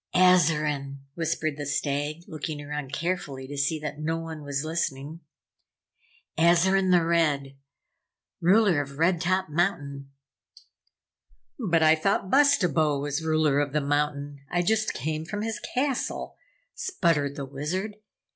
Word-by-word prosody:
"Azarine!" 150 -6 +3
whispered 160 -2 -2
the 145 - -4
Stag, 145 +2 -2
looking 155 -1 -5
around 145 -2 -5
carefully 145 -4 -3
to 145 - -7
see 140 +3 0
that 150 -1 -6
no 160 +2 -1
one 165 -1 -6
was 140 +1 -3
listening. 160 -1 -3 1.2
"Azarine 185 +3 +4
the 175 -2 +4
Red 150 -5 +1 0.9
Ruler 185 -3 +4
of 140 0 -8
Red 165 +1 +2
Top 185 0 0
Mountain!" 145 -5 -1 1.5
"But 170 -9 +2
I 155 0 +7
thought 190 +4 0
Bustabo 180 - +4
was 145 +2 -2
ruler 155 -3 +2
of 145 -1 -1
the 150 - +2
mountain! 145 0 -1
I 175 0 +1
just 215 +3 +1
came 155 +3 -3
from 205 +6 -4
his 225 -1 -3 0.2
castle!" 265 0 -1 0.4
sputtered 165 - 0
the 140 - -5
Wizard. 175 +10 -4
155 Hz, 130 wpm, -26 LUFS, 145-175 Hz, 1.5 s, I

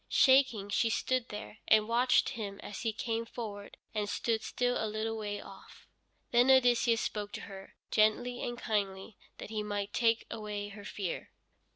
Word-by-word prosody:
Shaking 260 -7 +4
she 225 +3 +2
stood 255 +2 0
there, 210 0 -8
and 215 -1 +5
watched 245 +2 +3
him 205 -5 -5
as 205 - -7
he 225 - 0
came 225 +1 -2
forward, 215 -3 -7 0.2
and 210 -2 -1
stood 225 0 0
still 245 -2 0
a 220 - -1
little 215 +1 -2
way 205 -2 -4
off. 195 -1 -13 0.5
Then 245 +2 +5
Odysseus 245 -3 +5
spoke 205 -1 -3
to - - -5
her, 195 -1 -10 0.2
gently 245 +3 +2
and 240 0 -3
kindly, 200 -2 -2 0.2
that - - -8
he 215 -1 -1
might 205 -1 -3
take 230 -1 +2
away 210 -2 -4
her 205 0 -10
fear. 195 -5 -4
220 Hz, 170 wpm, -32 LUFS, 205-235 Hz, 0.5 s, and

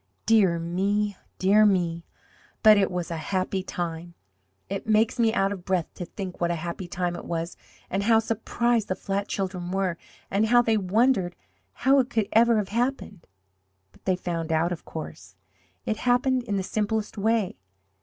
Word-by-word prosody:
Dear 200 -7 +4
me, 200 +5 0 0.2
dear 200 +3 +5
me, 175 -5 +1 0.6
but 215 -1 +9
it 200 -2 +2
was 180 -2 -4
a 165 - -2
happy 185 +4 -1
time! 170 -2 -5 0.5
It 200 +2 -5
makes 220 +3 +2
me 225 -1 +4
out 195 -3 +1
of 190 -3 -6
breath 185 -3 -1
to 180 - -6
think 185 +1 -7
what 170 - +2
a 170 - 0
happy 170 +2 -5
time 175 0 -2
it - - -7
was, 170 0 -4 0.3
and 195 - -1
how 225 +2 +4
surprised 225 0 0
the 185 - -1
flat 200 +1 -3
children 185 -2 -3
were, 185 -2 -1 0.3
and 205 +3 +2
how 240 +1 +5
they 225 -1 +2
wondered 200 -1 +2 0.5
how 275 +1 +6
it 255 -1 +1
could 220 -3 0
ever 235 +1 +5
have 205 -2 -1
happened. 230 -5 -2 0.6
But - - -25
they 185 - +2
found 170 -2 -3
out, 160 +2 +2
of 175 - -5
course! 95 - -8 0.5
It 220 - -1
happened 250 +1 +2
in 205 -4 -1
the 190 - -1
simplest 215 +2 -2
way! 215 - 0
195 Hz, 175 wpm, -26 LUFS, 175-220 Hz, 0.6 s, but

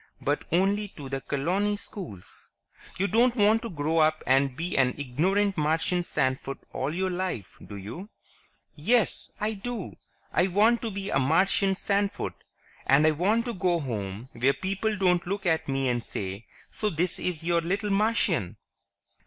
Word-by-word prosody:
"But 145 +1 -1
only 200 +4 +2
to 140 -3 -7
the 135 0 -3
colony 185 +11 0
schools. 175 - -8 0.4
You 190 - +1
don't 235 +4 +3
want 215 0 +4
to 230 - -5
grow 160 -1 0
up 155 0 +3
and 135 0 +2
be 175 +2 -3
an 130 -2 +3
ignorant 185 +9 +1
Martian 160 +4 +1
sandfoot 135 -4 -1 0.2
all 135 +3 -1
your 185 +3 -1
life, 180 - -4
do 100 - -9
you?" 115 - -7 0.7
"Yes, 220 +9 +1
I 215 +1 0
do! 220 0 -6 0.4
I 185 - +3
want 215 +5 +3
to 230 - -2
be 200 -1 -4
a 135 - +3
Martian 190 +7 +3
sandfoot. 200 +1 0 0.5
And 140 +3 +5
I 155 - +6
want 205 +9 +1
to 240 - -3
go 180 -3 +1
home 110 -4 -4
where 130 +4 +2
people 195 +5 -2
don't 180 -2 +2
look 195 +1 -3
at 160 -2 +1
me 135 -1 0
and 120 -1 0
say, 95 +2 -5 0.2
'So 215 - -1
this 175 0 -1
is 170 -3 -3
your 170 0 +2
little 200 +5 -1
Martian!'" 195 - +1
175 Hz, 165 wpm, -27 LUFS, 140-200 Hz, 0.7 s, I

